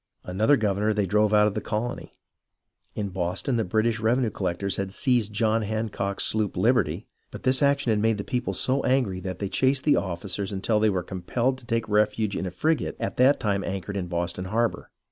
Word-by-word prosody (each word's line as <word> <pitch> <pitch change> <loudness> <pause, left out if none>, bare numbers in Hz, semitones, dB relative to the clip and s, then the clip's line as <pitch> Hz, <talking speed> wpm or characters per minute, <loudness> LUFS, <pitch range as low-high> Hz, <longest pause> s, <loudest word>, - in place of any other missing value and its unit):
Another 110 +10 +2
governor 105 0 0
they 105 -2 +1
drove 105 +2 +2
out 105 0 +5
of 105 - +1
the - - -3
colony. 115 +3 -4 0.8
In 100 -2 -2
Boston, 95 +8 -2
the 115 - +1
British 110 +4 0
revenue 115 +1 +1
collectors 95 +1 -2
had 95 -1 -3
seized 120 -1 +1
John 110 +1 +1
Hancock's 105 -2 -2
sloop 110 -2 0
Liberty, - - +1 0.2
but - - -10
this 130 +2 +2
action 140 -3 +2
had 105 - +2
made 110 0 +2
the 100 - -4
people 125 +3 -2
so 130 +2 +1
angry 125 -8 +1
that 95 -1 -5
they 100 - -3
chased 130 +6 +1
the 150 - +4
officers 95 +2 -3
until 105 +2 0
they 110 0 +3
were 95 -3 -1
compelled 115 +9 -2
to 120 - -17
take 115 -2 -1
refuge 105 0 +1
in 95 - -2
a - - -2
frigate 155 - -1
at - - -3
that 130 +3 +5
time 100 -3 0
anchored 95 +1 -4
in 95 -3 -2
Boston 85 +1 -3
harbour. 115 +4 -1
105 Hz, 200 wpm, -25 LUFS, 95-115 Hz, 0.8 s, out